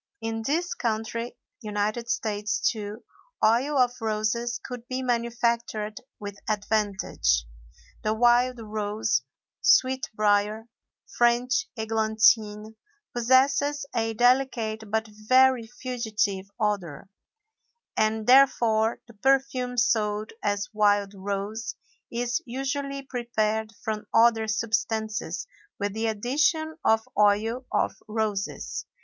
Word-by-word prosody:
In 225 Hz, 0 st, -3 dB
this 335 Hz, +4 st, 0 dB
country 230 Hz, +1 st, -3 dB, 0.2 s
(U. 215 Hz, -3 st, -6 dB
S.), 210 Hz, +1 st, -1 dB
too, 215 Hz, 0 st, -3 dB, 0.4 s
oil 255 Hz, +7 st, +3 dB
of 250 Hz, -2 st, +4 dB
roses 225 Hz, +2 st, -1 dB
could 245 Hz, -2 st, -8 dB
be 260 Hz, 0 st, -3 dB
manufactured 235 Hz, -3 st, -1 dB, 0.2 s
with 205 Hz, -1 st, -7 dB
advantage. 200 Hz, -, 0 dB, 0.6 s
The 215 Hz, 0 st, 0 dB
wild 240 Hz, +2 st, +3 dB
rose, 215 Hz, -, -1 dB, 0.4 s
sweet 260 Hz, 0 st, +3 dB
brier, 210 Hz, +1 st, +1 dB, 0.4 s
French 245 Hz, +6 st, +2 dB
églantine, 220 Hz, -1 st, +2 dB, 0.4 s
possesses 270 Hz, +4 st, +3 dB
a 225 Hz, -1 st, 0 dB
delicate 240 Hz, -3 st, +1 dB
but 220 Hz, +1 st, 0 dB
very 240 Hz, +3 st, +3 dB
fugitive 215 Hz, -6 st, -2 dB
odor, 200 Hz, -6 st, -2 dB, 0.9 s
and 215 Hz, 0 st, +1 dB
therefore 235 Hz, -4 st, +4 dB
the 235 Hz, -, -16 dB
perfume 255 Hz, +1 st, +1 dB
sold 215 Hz, -2 st, +1 dB
as 205 Hz, 0 st, -1 dB
wild 205 Hz, -1 st, +2 dB
rose 200 Hz, +3 st, -4 dB, 0.4 s
is 240 Hz, +1 st, -1 dB
usually 275 Hz, +2 st, -3 dB
prepared 220 Hz, -4 st, -1 dB
from 215 Hz, -1 st, -3 dB
other 225 Hz, -1 st, +4 dB
substances 220 Hz, -3 st, -1 dB, 0.3 s
with 205 Hz, 0 st, -2 dB
the 220 Hz, +1 st, -1 dB
addition 295 Hz, +9 st, 0 dB
of 220 Hz, 0 st, +2 dB
oil 215 Hz, +5 st, +2 dB
of -, -, +1 dB
roses. 215 Hz, -2 st, -3 dB
220 Hz, 100 wpm, -26 LUFS, 210-245 Hz, 0.9 s, of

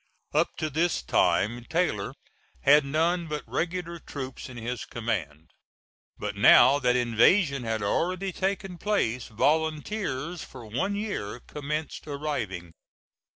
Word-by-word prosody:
Up 155 Hz, +3 st, +1 dB
to 155 Hz, -2 st, -2 dB
this 165 Hz, -, +1 dB
time 120 Hz, -, +2 dB
Taylor 160 Hz, -, 0 dB, 0.5 s
had 145 Hz, +2 st, +6 dB
none 165 Hz, +5 st, +1 dB
but 150 Hz, -1 st, -4 dB
regular 170 Hz, -1 st, -3 dB
troops 135 Hz, -5 st, -7 dB
in 125 Hz, -, -9 dB
his 120 Hz, 0 st, -4 dB
command; 85 Hz, -10 st, -4 dB, 0.7 s
but -, -, -4 dB
now 135 Hz, +4 st, +7 dB
that 125 Hz, -3 st, +2 dB
invasion 125 Hz, -, +3 dB
had 110 Hz, -2 st, -1 dB
already 185 Hz, -, 0 dB
taken 190 Hz, -1 st, -2 dB
place, 125 Hz, -, 0 dB
volunteers 160 Hz, -, -1 dB
for 125 Hz, -3 st, -11 dB
one 130 Hz, -, -1 dB
year 200 Hz, -, -3 dB
commenced 150 Hz, +2 st, -5 dB
arriving. 120 Hz, -, -3 dB
145 Hz, 120 wpm, -27 LUFS, 120-170 Hz, 0.7 s, now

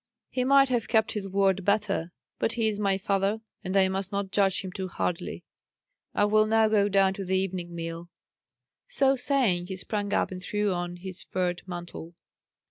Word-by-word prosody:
"He 255 Hz, -, 0 dB
might 275 Hz, +1 st, +5 dB
have 240 Hz, -4 st, 0 dB
kept 220 Hz, -2 st, +2 dB
his 205 Hz, -2 st, -3 dB
word 195 Hz, 0 st, +2 dB
better. 200 Hz, -4 st, 0 dB, 0.3 s
But 225 Hz, -, +1 dB
he 225 Hz, -2 st, +1 dB
is 210 Hz, -1 st, -1 dB
my 195 Hz, -2 st, +2 dB
father, 195 Hz, +2 st, 0 dB, 0.2 s
and 190 Hz, +1 st, -1 dB
I 190 Hz, -1 st, +5 dB
must 190 Hz, +1 st, -2 dB
not 200 Hz, -1 st, -2 dB
judge 195 Hz, -2 st, +2 dB
him 190 Hz, -, -6 dB
too 190 Hz, 0 st, -4 dB
hardly. 175 Hz, -1 st, -3 dB, 0.7 s
I 205 Hz, -, +4 dB
will 215 Hz, +1 st, +4 dB
now 220 Hz, 0 st, +4 dB
go 205 Hz, -2 st, +3 dB
down 195 Hz, -1 st, +3 dB
to 195 Hz, -, -5 dB
the 190 Hz, 0 st, 0 dB
evening 180 Hz, -2 st, -3 dB
meal." 165 Hz, +1 st, -6 dB, 0.8 s
So 275 Hz, -, +3 dB
saying, 245 Hz, -10 st, +1 dB
he 190 Hz, -, -4 dB
sprang 205 Hz, +2 st, -3 dB
up -, -, +1 dB
and 185 Hz, -1 st, -6 dB
threw 205 Hz, 0 st, 0 dB
on 175 Hz, 0 st, -3 dB
his 185 Hz, 0 st, -6 dB
furred 180 Hz, -1 st, -2 dB
mantle. 175 Hz, -1 st, -7 dB
195 Hz, 190 wpm, -27 LUFS, 185-215 Hz, 0.8 s, might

